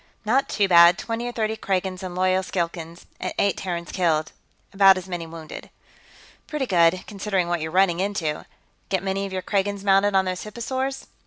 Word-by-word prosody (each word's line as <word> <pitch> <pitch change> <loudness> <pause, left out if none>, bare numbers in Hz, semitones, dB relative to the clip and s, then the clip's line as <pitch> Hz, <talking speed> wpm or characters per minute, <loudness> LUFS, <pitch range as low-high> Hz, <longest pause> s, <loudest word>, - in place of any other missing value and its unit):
"Not 255 +6 +2
too 205 -2 +1
bad. 170 0 +7
Twenty 230 +1 -4
or - - -3
thirty 220 -2 -1
Kragans 190 -3 -2
and 185 -2 -6
loyal 185 +1 +2
Skilkans, 170 -2 -4
and - - -3
eight 200 - +2
Terrans 170 -2 -5
killed, 160 -4 0 0.4
about 195 -1 +6
as 185 0 -7
many 175 -3 -5
wounded." 160 -1 -9 0.8
"Pretty 300 -3 -2
good, 180 -3 +3
considering 195 -3 -2
what 175 -1 -1
you're 160 - -3
running 180 0 +2
into. 185 -6 -2 0.4
Get 190 -1 0
many 195 +1 -2
of - - -10
your 185 -1 -4
Kragans 200 0 -1
mounted 195 0 +3
on 190 0 +4
those 185 0 -3
hipposaurs?" 260 +5 -4
190 Hz, 180 wpm, -23 LUFS, 175-205 Hz, 0.8 s, bad